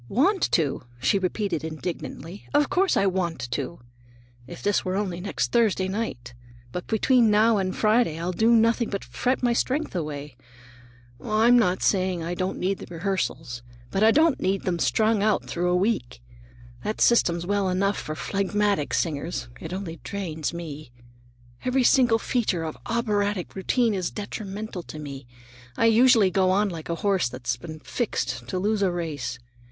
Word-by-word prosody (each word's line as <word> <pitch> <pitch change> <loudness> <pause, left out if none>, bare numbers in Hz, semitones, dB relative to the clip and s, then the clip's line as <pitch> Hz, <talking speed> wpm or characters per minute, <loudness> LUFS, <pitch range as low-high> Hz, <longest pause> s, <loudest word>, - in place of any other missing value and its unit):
"Want 360 - +2
to?" 150 -5 +1 0.2
she 130 +10 +2
repeated 190 -2 -2
indignantly; 165 +3 -6
"of 290 0 +3
course 380 +1 +2
I 195 - +3
want 170 -10 -1
to! 170 +6 -4 0.7
If - - -10
this 205 -1 +2
were 185 0 -2
only 185 -3 -2
next 200 - -2
Thursday 215 -5 +2
night—But 120 - -6
between 235 +1 +3
now 215 +1 +4
and 185 -1 -2
Friday 215 -6 +2
I'll 170 +2 -2
do 220 +6 +2
nothing 230 0 +3
but 200 - -3
fret 245 - -1
away - - +4
my 240 - +2
strength. 270 +2 -1
Oh, 160 -4 -2 1.1
I'm 220 +3 +4
not 185 -5 +1
saying 185 -3 +1
I 170 +2 -3
don't 185 +1 -2
need 190 +1 -1
the - - -9
rehearsals! 170 -9 -3 0.3
But 195 - -1
I 220 - +7
don't 310 +4 +4
need 195 0 0
them 175 -2 -1
strung 220 +2 +2
out 215 0 +2
through 175 +1 -1
a 180 - +2
week. 180 - 0 0.6
That 215 - -3
system's 175 -7 +3
well 200 0 +1
enough 195 +2 +1
for 155 - -5
phlegmatic 200 -3 0
singers; 155 -4 -2
it 160 - -7
only 185 -3 -5
drains 165 -7 -4
me. 155 -5 -7 0.7
Every 255 +1 +2
single 240 -2 +5
feature 225 -8 -1
of 160 -1 -4
operatic 205 -5 -1
routine 225 +4 +1
is 185 -3 -1
detrimental 205 -1 -6
to 155 - -10
me. 140 -4 -8 0.5
I - - +3
usually 230 -3 +5
go 185 -1 +3
on 200 +2 +2
like 165 -3 -7
a 170 - 0
horse 190 -10 +2
that's 125 0 -3
been 155 +5 -9
fixed 240 +7 -3
to 185 - -3
lose 210 +3 0
a 195 - +3
race. 155 -8 -4
190 Hz, 170 wpm, -25 LUFS, 165-220 Hz, 1.1 s, I